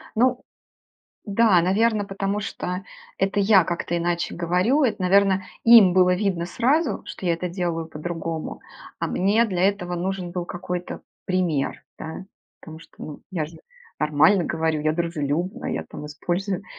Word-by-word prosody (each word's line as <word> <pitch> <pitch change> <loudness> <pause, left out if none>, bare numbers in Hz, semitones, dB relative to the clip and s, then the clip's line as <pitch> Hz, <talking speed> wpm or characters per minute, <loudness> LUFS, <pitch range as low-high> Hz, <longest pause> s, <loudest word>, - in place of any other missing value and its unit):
Ну 250 +2 +3 0.8
да, 205 -3 +4
наверное, 210 +4 +2
потому 195 +1 -2
что 180 -2 -4 0.3
это 195 +1 0
я 195 -2 +5
как-то 175 0 -2
иначе 170 0 -1
говорю, 180 - +1
это, 225 -5 0
наверное, 190 0 +3 0.2
им 230 -6 +8
было 180 0 +4
видно 180 -3 -1
сразу, 275 - +1
что 185 - -7
я 170 - +3
это 180 +2 -4
делаю 170 -2 -2
по-другому, 165 0 -5 0.4
а - - -1
мне 205 +5 +2
для 185 -5 -1
этого 180 -3 -3
нужен 180 0 -3
был 180 -1 -3
какой-то 180 0 -5 0.2
пример, 175 -7 -1
да. 160 +4 -7 0.4
Потому 160 0 -10
что, - - -18
ну 150 - -8
я 170 -5 -2
же 160 +2 -12 0.4
нормально 155 +6 +4
говорю, 160 -2 -1
я 155 +1 +1
дружелюбна, 170 - -2
я, - - -3
там 150 - -9
использую 180 +6 -3
180 Hz, 150 wpm, -23 LUFS, 170-200 Hz, 0.8 s, им